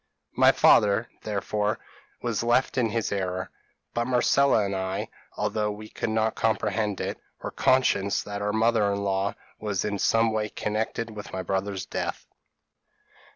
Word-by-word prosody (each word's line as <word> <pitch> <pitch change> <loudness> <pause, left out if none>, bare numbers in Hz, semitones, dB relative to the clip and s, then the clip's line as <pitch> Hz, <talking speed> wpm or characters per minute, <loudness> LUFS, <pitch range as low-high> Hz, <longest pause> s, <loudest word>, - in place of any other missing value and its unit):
p> - - -4
"My - - +8
father, 105 +3 +4
therefore, 105 0 -1 0.5
was 115 -3 0
left 120 +2 +2
in 120 -3 +2
his 115 0 -1
error; 95 -2 -2 0.4
but 120 0 0
Marcella 130 -2 +3
and 100 0 -2
I, 95 0 -2 0.3
although 105 0 0
we 105 +1 -7
could - - -3
not 110 0 +1
comprehend 105 -1 0
it, - - -3 0.2
were - - -3
conscious 125 -6 +2
that 100 0 -5
our 105 0 0
mother 110 -1 +3
in 100 0 -2
law 100 0 0 0.2
was 105 -3 -2
in 100 -1 -2
some 115 +2 +3
way 110 -1 -1
connected 110 +2 -2
with 105 -1 -8
my 95 0 -3
brother's 95 +1 -2
death. - - -4
105 Hz, 155 wpm, -26 LUFS, 100-115 Hz, 0.5 s, My